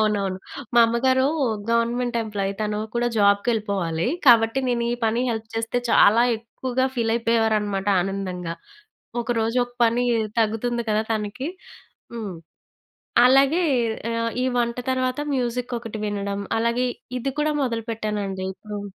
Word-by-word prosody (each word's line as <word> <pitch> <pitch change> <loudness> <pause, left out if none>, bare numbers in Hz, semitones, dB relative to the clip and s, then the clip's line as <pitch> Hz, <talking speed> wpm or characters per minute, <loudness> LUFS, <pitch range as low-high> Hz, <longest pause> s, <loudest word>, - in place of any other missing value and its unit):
అవునవును. 200 -3 0 0.4
మా 235 - +7
అమ్మగారు 260 +3 +2 0.4
గవర్నమెంట్ 235 +1 +1
ఎంప్లాయ్ 200 -2 -2
తను 210 0 -1 0.2
కూడా 240 0 +1
జాబ్‌కెళ్ళిపోవాలి. 200 -5 +1 0.2
కాబట్టి 230 +2 +5
నేను 235 -1 0
ఈ - - +1
పని 230 +3 +1
హెల్ప్ 220 -1 -4
చేస్తే, 225 +2 -1
చాలా 225 +1 +6 0.2
ఎక్కువగా 255 +3 -2
ఫీలయిపోయేవారనమాట 225 -3 +1 0.2
ఆనందంగా. 185 -3 -4 0.7
ఒకరోజు 230 0 0
ఒక 245 0 -18
పని 235 +2 +2 0.4
తగ్గుతుంది 230 +2 0
కదా! 215 +1 +2
తనకి. 220 +7 -3 0.7
హ్మ్. 210 -6 -5 0.9
అలాగే 275 +7 +4 0.5
ఆహ్, 230 0 -1
ఈ - - +1
వంట 235 -1 0 0.2
తర్వాత 255 +2 -1
మ్యూజికొకటి 240 -3 -3
వినడం. 200 -1 -3 0.2
అలాగే 235 +2 +1 0.3
ఇది 270 +3 -2
కూడా 305 0 +1
మొదలుపెట్టానండి 215 -5 -3
ఇప్పుడు. 210 +1 -7
230 Hz, 115 wpm, -23 LUFS, 210-240 Hz, 0.9 s, మా